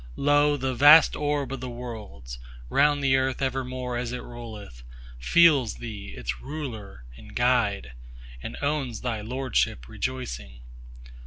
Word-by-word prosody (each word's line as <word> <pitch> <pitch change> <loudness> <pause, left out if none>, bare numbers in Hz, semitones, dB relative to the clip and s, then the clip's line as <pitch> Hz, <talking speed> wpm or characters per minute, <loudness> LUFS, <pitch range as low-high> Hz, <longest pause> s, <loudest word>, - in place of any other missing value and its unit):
Lo, 145 +1 +3
the 130 -1 -2
vast 145 +5 +7
orb 145 -3 -1
of 135 - -5
the 130 +1 -5
Worlds, 105 - -8 0.3
round 145 - +3
the 135 -1 +4
Earth 130 0 0
evermore 130 -2 -2
as 120 -1 -3
it 125 - -5
rolleth, 110 - -10 0.4
Feels 140 - +4
Thee 105 -4 -8
its 60 0 -4
Ruler 110 - -7
and - - -14
Guide, - - +1 0.5
and - - -7
owns 140 -5 -1
Thy 115 -4 -2
lordship 125 - -1
rejoicing. 65 - -5
125 Hz, 135 wpm, -26 LUFS, 105-135 Hz, 0.5 s, vast